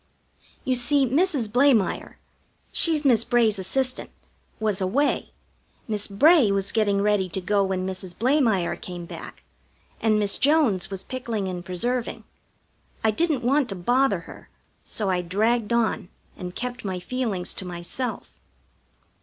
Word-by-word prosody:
You 260 - +2
see, 270 +3 +3
Mrs. 285 - +1
Blamire 245 -2 +2 0.5
she's 315 -3 +2
Miss 235 -4 +4
Bray's 225 -4 +2
assistant 255 +7 -2 0.5
was 210 -3 -1
away; 250 +11 0 0.6
Miss 210 -2 -2
Bray 270 - +5
was 195 -1 0
busy - - -5
getting 205 -2 +2
ready 205 -3 +2
to 185 - -2
go 200 +2 +1
when 190 -1 -1
Mrs. 185 -1 -6
Blamire 235 - +2
came 175 -1 -8
back; - - -10 0.6
and 220 -1 +3
Miss 205 -1 +1
Jones 275 - +3
was 195 -1 -6
pickling 235 -6 -3
and 180 -1 -5
preserving. 235 +8 -2 0.8
I 220 - +4
didn't 300 +1 0
want 275 +2 +2
to 195 - -3
bother 245 +9 +2
her, - - -13 0.3
so 205 -4 -2
I 180 -1 +1
dragged 215 +6 0
on, 225 -5 0 0.3
and 180 0 -7
kept 245 0 -4
my 190 -3 -3
feelings 205 -3 -2
to - - -5
myself. 180 +7 -5
215 Hz, 145 wpm, -24 LUFS, 190-255 Hz, 0.8 s, Bray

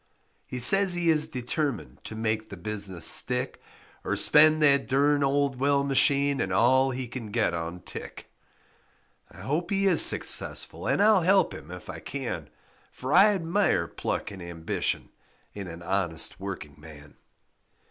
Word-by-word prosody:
He 125 - -6
says 185 +9 +5
he 170 -1 +2
is 155 -1 +3
determined 125 - -4
To 110 - -7
make 110 0 -3
the 100 - -10
business 95 -3 -3
stick 125 +7 +1 0.4
Or - - -2
spend 155 +1 +4
that 140 -2 +3
derned 145 +2 +1
old 140 -1 0
well 140 +1 +1
machine 140 0 +2
And 95 - -3
all 130 +7 +3
he 130 -1 -5
can 120 -2 -8
get 110 -4 -1
on 85 +1 -6
tick. - - -10 1.0
I - - -15
hope 160 +5 -3
he 195 0 0
is 180 -5 +5
successful - - +2
And 200 - +1
I'll 210 -3 +4
help 190 +3 +2
him 75 - -11
if 90 -2 -10
I - - -8
can, - - -6 0.4
For 130 +3 -5
I 195 +3 +7
admire 170 - 0
pluck - - -5
and 95 -2 -10
ambition 85 -1 -4 0.4
In 100 -2 -8
an 85 0 -10
honest 90 -4 -2
working 95 -8 -8
man. 75 -2 -14
125 Hz, 155 wpm, -26 LUFS, 95-150 Hz, 1.0 s, I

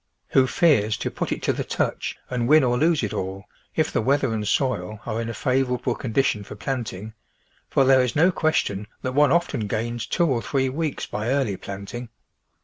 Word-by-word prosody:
Who 130 -1 +4
fears 120 -10 +3
to - - -3
put - - -3
it - - -3
to - - +2
the - - -3
touch, - - -2
and 120 -1 -1
win 155 +1 +6
or 125 -1 +2
lose 155 +1 +2
it 105 - -2
all," 95 +1 -4 0.3
if 155 - +1
the - - +2
weather 135 0 +1
and 105 -1 -2
soil 110 -7 0
are 110 +1 -2
in 115 - -4
a - - -3
favourable 125 -2 0
condition 115 -3 0
for 105 - -9
planting, 110 -1 -4 0.6
for 135 - +3
there 130 0 +6
is 125 -1 -1
no 170 +5 +5
question 130 - 0 0.2
that 130 - -2
one 145 +1 +4
often 170 -10 +1
gains 115 +2 -3
two 175 - +2
or 130 -7 +1
three 130 +4 0
weeks 150 +1 -2
by 105 +3 -3
early 130 -7 +1
planting. 100 +6 -7
125 Hz, 200 wpm, -24 LUFS, 110-135 Hz, 0.6 s, win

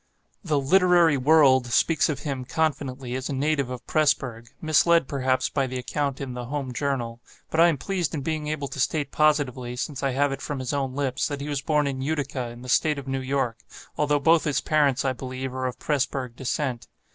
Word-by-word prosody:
"The 155 -6 +1
Literary 175 +1 +4
World" 135 -2 +5
speaks 155 +6 +2
of 145 -3 -3
him, 135 -4 -3
confidently, 135 -4 -2
as 130 +2 -3
a - - -2
native 140 -1 0
of 125 -1 -7
Presburg 130 -6 0
(misled, 160 0 +3
perhaps, 130 -2 0
by 135 -2 -1
the 130 0 -4
account 140 +2 -2
in 135 -2 -5
"The 125 0 -5
Home 135 0 -4
Journal") 120 -3 -2 0.3
but 160 - 0
I 170 - +8
am 165 -4 +1
pleased 180 -1 -2
in 145 - -3
being 155 +1 -3
able 150 -2 -2
to - - -7
state 145 +1 0
positively, 135 -5 +1
since 135 +2 -4
I 135 - +1
have 140 +2 +1
it 135 0 -5
from 145 - -4
his 130 +1 -3
own 135 -2 -2
lips, 135 -3 -1
that 145 -2 -4
he 145 +2 -5
was 145 -2 -1
born 150 0 +1
in 135 -2 -3
Utica, 140 -3 -2
in 120 +1 -11
the - - -9
State 150 +4 +2
of 140 -1 -7
New 135 0 -2
York, 130 -4 -1 0.4
although 150 -1 +1
both 160 +3 +4
his 150 -3 +1
parents, 145 -4 +2
I 130 - +1
believe, 130 +1 -5
are 130 0 -2
of 125 - -5
Presburg 135 -4 -2
descent. 130 -1 -3
140 Hz, 215 wpm, -25 LUFS, 130-150 Hz, 0.4 s, I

